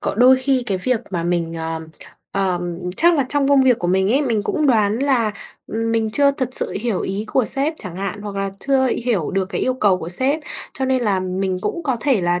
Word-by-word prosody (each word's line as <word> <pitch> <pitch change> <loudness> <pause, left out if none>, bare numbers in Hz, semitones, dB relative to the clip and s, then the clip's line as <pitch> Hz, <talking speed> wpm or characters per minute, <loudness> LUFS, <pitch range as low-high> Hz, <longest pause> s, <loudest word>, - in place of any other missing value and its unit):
có - - -2
đôi 255 +4 +6
khi 260 -1 +1
cái 195 -4 -1
việc 235 +4 0
mà 175 -3 -2
mình 170 -1 -1
ờm, 160 0 -4 0.5
ờm, 175 -3 -1 0.2
chắc 340 +1 +5
là 280 -4 +2
trong 285 0 +1
công 280 -1 +5
việc 250 -3 +4
của 175 - -2
mình 190 +1 +2
ấy, 280 - +3
mình 230 -6 0
cũng 305 +7 0
đoán 220 -3 +3
là, 255 -6 +1 0.3
ừm, 225 +1 -2
mình 225 -1 0
chưa 280 +5 +4
thật 260 -3 -2
sự - - -2
hiểu 225 -4 -1
ý 195 +3 -3
của 260 - +2
sếp 275 +6 -1
chẳng 180 -5 -7
hạn, 195 +1 -4
hoặc 205 -1 -6
là 195 0 -1 0.2
chưa 270 -1 +3 0.2
hiểu 210 -11 0
được 195 0 0
cái - - -3
yêu 255 - +1
cầu 200 -7 +2
của 165 - -6
sếp. 265 - 0 0.3
Cho 265 - -2
nên 260 -1 +1
là 200 -4 +1
mình 185 0 -2
cũng 340 - -3
có 265 -5 0
thể 265 -6 +2
là 175 0 +1
220 Hz, 240 wpm, -20 LUFS, 185-260 Hz, 0.5 s, đôi